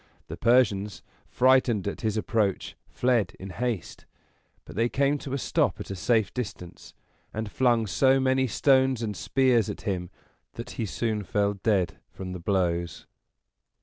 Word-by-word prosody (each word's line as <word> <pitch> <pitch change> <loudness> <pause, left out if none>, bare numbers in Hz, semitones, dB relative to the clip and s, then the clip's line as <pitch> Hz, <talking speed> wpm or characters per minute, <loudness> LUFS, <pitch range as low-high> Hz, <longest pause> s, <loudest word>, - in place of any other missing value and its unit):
The - - -5
Persians, 105 -6 +2 0.2
frightened 125 +2 +3
at 100 - -4
his 110 -1 -1
approach, 105 -3 -1
fled 120 -7 +1
in 95 0 -7
haste; 115 -1 -4 0.6
but - - -11
they 115 +3 +1
came 140 +2 +1
to 135 - -6
a - - 0
stop - - 0
at - - -7
a - - -3
safe 110 +2 +1
distance, 105 -8 -7 0.4
and 110 -1 -4
flung 120 -2 +2
so 130 +9 +3
many 130 0 +2
stones 130 +1 +3
and 105 -2 -3
spears 125 -1 +2
at - - -6
him 90 -5 -3 0.4
that - - -7
he 110 - -3
soon 110 +1 -2
fell 100 +1 0
dead 100 -3 0
from 95 -1 -7
the 90 - -6
blows. 85 -2 -1
110 Hz, 155 wpm, -26 LUFS, 95-125 Hz, 0.6 s, frightened